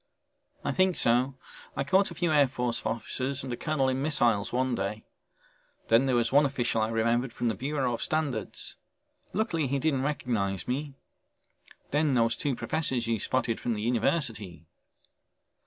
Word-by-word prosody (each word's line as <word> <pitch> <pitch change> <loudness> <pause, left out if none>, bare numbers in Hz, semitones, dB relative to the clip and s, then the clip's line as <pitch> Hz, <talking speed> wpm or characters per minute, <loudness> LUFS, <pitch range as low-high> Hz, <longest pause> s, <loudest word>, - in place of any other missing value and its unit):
"I - - +1
think 185 -1 +2
so, 125 +3 +2 0.4
I 140 - +1
caught 190 +8 +3
a - - -9
few 170 -2 0
Air 145 -2 +5
Force 125 -2 -2
officers 130 +5 -3
and 130 -2 -4
a - - -1
colonel 145 -1 0
in 130 0 0
missiles 120 -9 +2
one 130 +1 +1
day. 105 0 -3 0.8
Then 115 +4 +5
there 130 - +2
was 120 -1 +2
one 145 +2 +6
official 120 -5 0
I 110 - +2
remembered 115 +2 +1
from 120 0 -1
the - - 0
Bureau 130 +2 -1
of 115 - -4
Standards. 145 -8 -2 0.5
Luckily 180 - 0
he 140 +2 0
didn't 140 -2 +1
recognize 110 - -1
me. 140 +2 -3 1.0
Then 145 -2 +2
those 115 -1 +3
two 140 0 -1
professors 130 -4 -1
you 115 -1 0
spotted 120 0 0
from 120 - -1
the 105 - -4
university." 110 - -1
130 Hz, 165 wpm, -28 LUFS, 115-145 Hz, 1.0 s, one